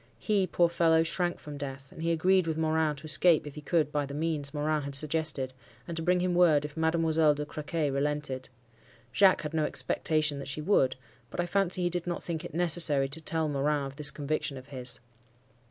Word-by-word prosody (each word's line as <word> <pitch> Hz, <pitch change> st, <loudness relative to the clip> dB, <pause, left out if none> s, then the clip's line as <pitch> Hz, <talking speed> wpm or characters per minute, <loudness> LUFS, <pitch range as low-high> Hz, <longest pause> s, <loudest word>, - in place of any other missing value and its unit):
He, 200 Hz, -3 st, 0 dB
poor 175 Hz, -1 st, +3 dB
fellow, 165 Hz, -1 st, +3 dB
shrank 175 Hz, +1 st, -1 dB
from 150 Hz, -1 st, -9 dB
death; 135 Hz, -1 st, -7 dB
and -, -, -10 dB
he 165 Hz, +1 st, 0 dB
agreed 180 Hz, +2 st, +2 dB
with 160 Hz, -1 st, -2 dB
Morin 160 Hz, -1 st, +1 dB
to 140 Hz, +3 st, -11 dB
escape, 160 Hz, +1 st, +3 dB
if 145 Hz, -, -8 dB
he 150 Hz, -, -9 dB
could, 150 Hz, -1 st, 0 dB
by 145 Hz, -1 st, -1 dB
the 140 Hz, -, -7 dB
means 150 Hz, -2 st, -2 dB
Morin 150 Hz, 0 st, -1 dB
had 140 Hz, -1 st, -4 dB
suggested, 150 Hz, -3 st, +1 dB, 0.3 s
and 170 Hz, -, -5 dB
to 165 Hz, -, -3 dB
bring 180 Hz, +2 st, +2 dB
him 180 Hz, 0 st, 0 dB
word 165 Hz, -5 st, +4 dB
if 150 Hz, -, -8 dB
Mademoiselle 160 Hz, -1 st, +2 dB
de 150 Hz, 0 st, -4 dB
Crequy 150 Hz, 0 st, -3 dB
relented. 140 Hz, -2 st, -2 dB, 0.6 s
(Jacques 190 Hz, +3 st, +4 dB
had 150 Hz, -, -5 dB
no 155 Hz, -1 st, +1 dB
expectation 155 Hz, -1 st, 0 dB
that 140 Hz, -, -7 dB
she 140 Hz, +2 st, -3 dB
would; 150 Hz, -6 st, +2 dB, 0.3 s
but -, -, -8 dB
I 175 Hz, -, +1 dB
fancy 185 Hz, 0 st, +1 dB
he 175 Hz, -, +1 dB
did 175 Hz, 0 st, -4 dB
not 175 Hz, -, -3 dB
think 165 Hz, -1 st, -4 dB
it 175 Hz, -, -8 dB
necessary 165 Hz, -5 st, +4 dB
to 160 Hz, +4 st, -4 dB
tell 160 Hz, 0 st, -1 dB
Morin 145 Hz, 0 st, 0 dB
of 135 Hz, 0 st, -9 dB
this 150 Hz, -1 st, +3 dB
conviction 150 Hz, 0 st, -3 dB
of 130 Hz, +1 st, -12 dB
his.) 125 Hz, -3 st, -6 dB
155 Hz, 215 wpm, -29 LUFS, 145-170 Hz, 0.6 s, word